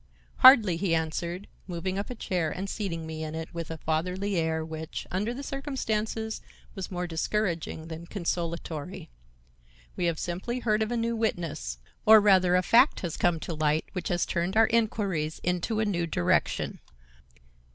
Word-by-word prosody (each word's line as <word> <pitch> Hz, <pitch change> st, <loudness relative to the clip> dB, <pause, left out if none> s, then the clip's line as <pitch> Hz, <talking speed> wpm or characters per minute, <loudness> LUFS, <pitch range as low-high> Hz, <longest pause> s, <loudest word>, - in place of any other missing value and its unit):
"Hardly," 225 Hz, -10 st, +8 dB
he 170 Hz, -2 st, +1 dB
answered, 170 Hz, +4 st, -3 dB, 0.2 s
moving 185 Hz, +2 st, -3 dB
up 200 Hz, -, -4 dB
a 250 Hz, -, -5 dB
chair 180 Hz, -7 st, -1 dB
and 190 Hz, +5 st, -4 dB
seating 185 Hz, -6 st, -3 dB
me 160 Hz, 0 st, -5 dB
in 155 Hz, 0 st, -5 dB
it 160 Hz, +1 st, -6 dB
with 165 Hz, -1 st, -5 dB
a 160 Hz, -, -5 dB
fatherly 180 Hz, +6 st, -1 dB
air 160 Hz, -1 st, 0 dB
which, 160 Hz, 0 st, -6 dB
under 205 Hz, +5 st, -1 dB
the 265 Hz, +3 st, -6 dB
circumstances, 225 Hz, -6 st, -2 dB, 0.3 s
was 190 Hz, -3 st, -5 dB
more 180 Hz, -1 st, -3 dB
discouraging 170 Hz, -2 st, -2 dB
than 165 Hz, +1 st, -8 dB
consolatory. 170 Hz, -, -4 dB, 0.8 s
"We 180 Hz, -, -1 dB
have 170 Hz, -2 st, +1 dB
simply 190 Hz, +10 st, -3 dB
heard 215 Hz, -2 st, +1 dB
of 220 Hz, +1 st, 0 dB
a 240 Hz, -, 0 dB
new 230 Hz, 0 st, 0 dB
witness, 170 Hz, -, -2 dB, 0.3 s
or 220 Hz, 0 st, +9 dB
rather 190 Hz, -3 st, +5 dB
a 180 Hz, -, +3 dB
fact 240 Hz, +9 st, +5 dB
has 175 Hz, -4 st, -3 dB
come 175 Hz, -2 st, +2 dB
to 170 Hz, -, -4 dB
light 155 Hz, 0 st, +1 dB
which 180 Hz, -, -3 dB
has 175 Hz, -1 st, +1 dB
turned 185 Hz, +4 st, -1 dB
our 225 Hz, -, +7 dB
inquiries 200 Hz, -9 st, 0 dB
into 180 Hz, +5 st, 0 dB
a 220 Hz, -, +2 dB
new 175 Hz, -5 st, 0 dB
direction." 90 Hz, -, 0 dB
180 Hz, 170 wpm, -28 LUFS, 165-215 Hz, 0.8 s, or